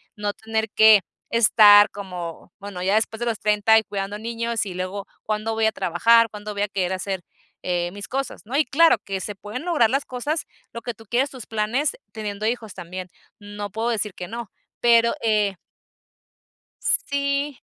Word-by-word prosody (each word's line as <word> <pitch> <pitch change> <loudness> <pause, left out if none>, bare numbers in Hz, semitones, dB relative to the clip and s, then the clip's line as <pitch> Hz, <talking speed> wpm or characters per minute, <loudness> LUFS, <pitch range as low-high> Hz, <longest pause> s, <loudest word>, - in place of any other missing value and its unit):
no 210 -1 -2
tener 220 0 -2
que 220 -1 +7 0.3
estar 210 -2 +7
como, 180 -4 -7
bueno, 200 -3 -7
ya 190 +3 +2
después 220 0 0
de 240 - -2
los 230 -3 -1
30 210 +1 +4
y 220 - +3
cuidando 200 0 -4
niños, 230 0 -2
y 190 - -6
luego, 185 +2 -4 0.2
¿cuándo 215 +1 -2
voy 220 0 +1
a 220 - +3
trabajar, 230 +7 +4
cuándo 210 0 -7
voy 200 - -3
a 205 - +1
querer 190 -2 -1
hacer, 190 0 -3 0.5
eh, 175 -1 0
mis 205 +2 -8
cosas, 270 +1 -4
no?, 245 +5 -5
y 300 - +4
claro, 330 +3 +5
que 195 -1 -4
se 205 - -5
pueden 210 - -7
lograr 305 -11 +3
las 275 +4 0
cosas, 290 +6 -3 0.3
lo 235 - -7
que 240 - -4
tú 225 0 -17
quieres, 250 +6 +1
tus 255 -4 -9
planes, 225 +7 -1 0.2
teniendo 210 -1 -4
hijos 225 -3 -2
también, 180 +1 -7 0.3
no 205 0 -7
puedo 225 +3 -1
decir 215 -3 -1
que 180 - -7
no. 230 0 -7 0.3
Pero 235 -1 +5
eh 210 -3 +1 1.3
sí, 280 0 0
215 Hz, 185 wpm, -23 LUFS, 200-235 Hz, 1.3 s, que